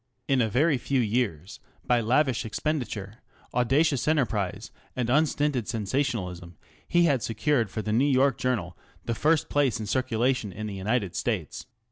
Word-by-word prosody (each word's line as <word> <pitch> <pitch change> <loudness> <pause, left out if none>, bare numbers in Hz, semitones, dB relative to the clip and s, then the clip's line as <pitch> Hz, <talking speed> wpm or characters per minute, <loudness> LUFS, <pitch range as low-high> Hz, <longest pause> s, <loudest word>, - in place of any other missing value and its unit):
In 135 -2 +3
a 110 - +1
very 140 +5 +2
few 135 +2 0
years, 105 -7 -1 0.3
by 120 -1 +3
lavish 130 +2 +2
expenditure, 115 -4 -3 0.3
audacious 135 +4 +2
enterprise, 115 - 0 0.2
and 120 -2 -1
unstinted 145 -4 +1
sensationalism 100 - -2 0.3
he 175 0 +3
had 140 -7 +2
secured 115 +1 0
for 110 +3 -4
the 105 - -1
New 135 +6 +3
York 135 +1 +3
Journal 105 -9 -1 0.3
the 115 - -1
first 155 +6 +2
place 135 -5 +1
in 110 - -4
circulation 125 -1 0
in 110 +4 -6
the 105 - -5
United 100 -1 -1
States. 95 - -3
120 Hz, 150 wpm, -27 LUFS, 105-135 Hz, 0.3 s, In